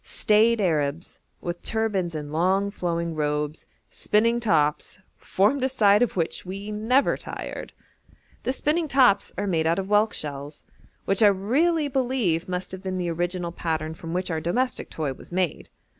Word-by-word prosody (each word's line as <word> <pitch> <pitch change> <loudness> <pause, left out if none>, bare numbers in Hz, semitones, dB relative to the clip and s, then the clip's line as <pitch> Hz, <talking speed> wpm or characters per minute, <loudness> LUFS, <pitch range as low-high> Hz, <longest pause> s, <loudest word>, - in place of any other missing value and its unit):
Staid 220 +2 +3
Arabs, 155 -3 -1 0.2
with 175 0 -5
turbans 200 -7 -1
and 150 -1 -5
long, 190 +5 +1
flowing 170 -3 -2
robes, 150 0 -2 0.2
spinning 230 +3 +2
tops, 155 -10 +1 0.2
formed 220 +8 +1
a 260 - +2
sight 210 -4 +4
of 245 -5 +1
which 165 -2 -1
we 195 +3 -6
never 225 +6 +2
tired. - - -7 0.7
The - - -1
spinning 310 +4 +1
tops 250 -8 +4
are 205 - -1
made 165 -5 +1
out 165 - +2
of 195 - -2
whelk 210 +1 +3
shells, 145 0 -5 0.4
which 195 +1 +1
I 215 - +8
really 285 - +2
believe 245 - 0
must 180 0 -3
have 190 0 -6
been 190 -1 -3
the 175 -2 -1
original 175 +1 -2
pattern 160 -2 -3
from 165 0 -8
which 180 +1 -2
our 160 -1 -2
domestic 250 +10 -1
toy 150 -4 -3
was - - -15
made. 180 -3 -2
185 Hz, 165 wpm, -25 LUFS, 165-220 Hz, 0.7 s, I